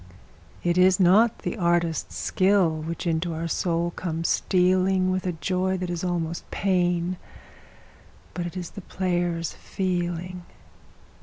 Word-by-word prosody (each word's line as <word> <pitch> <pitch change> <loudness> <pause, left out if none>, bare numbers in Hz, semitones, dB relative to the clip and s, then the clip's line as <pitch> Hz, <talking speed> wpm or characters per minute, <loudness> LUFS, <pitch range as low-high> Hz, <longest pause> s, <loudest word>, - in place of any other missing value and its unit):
It 175 +1 +2
is 185 +1 +5
not 205 +5 +4
the - - -3
artist's 170 -3 0
skill 190 -2 +2
which 160 +3 -5
into 165 0 0
our 165 +1 -3
soul 170 0 0
comes 165 -2 -3
stealing 185 0 +2
With 185 0 -1
a 180 - 0
joy 185 +3 -1
that 180 -1 -3
is 175 0 -3
almost 170 -2 -2
pain, 180 -2 0 1.2
but 175 -1 -3
it 175 - -7
is 175 -2 -5
the - - -8
player's 175 -2 -1
feeling. 180 -1 -3
175 Hz, 135 wpm, -25 LUFS, 170-185 Hz, 1.2 s, is